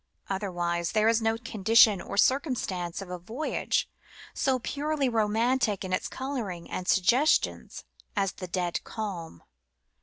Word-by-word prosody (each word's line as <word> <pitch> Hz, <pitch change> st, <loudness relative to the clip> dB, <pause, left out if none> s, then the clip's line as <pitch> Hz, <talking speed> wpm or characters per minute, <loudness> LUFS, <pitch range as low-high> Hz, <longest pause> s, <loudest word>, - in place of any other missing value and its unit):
Otherwise 175 Hz, -3 st, -2 dB
there 215 Hz, 0 st, +3 dB
is 230 Hz, 0 st, +3 dB
no 225 Hz, 0 st, +1 dB
condition 220 Hz, -2 st, +4 dB
or -, -, -6 dB
circumstance 205 Hz, -, 0 dB
of 180 Hz, -, -11 dB
a 180 Hz, -, -5 dB
voyage 230 Hz, -, -1 dB, 0.5 s
so 265 Hz, -1 st, +1 dB
purely 285 Hz, +3 st, -1 dB
romantic 225 Hz, -1 st, +1 dB
in 185 Hz, -, -4 dB
its 185 Hz, -, 0 dB
colouring 230 Hz, -11 st, -5 dB
and 180 Hz, -, -4 dB
suggestions 245 Hz, +11 st, +2 dB, 0.3 s
as 195 Hz, -2 st, +1 dB
the 185 Hz, -, -8 dB
dead 175 Hz, -1 st, -2 dB
calm. 180 Hz, -, -6 dB
215 Hz, 130 wpm, -28 LUFS, 185-245 Hz, 0.5 s, condition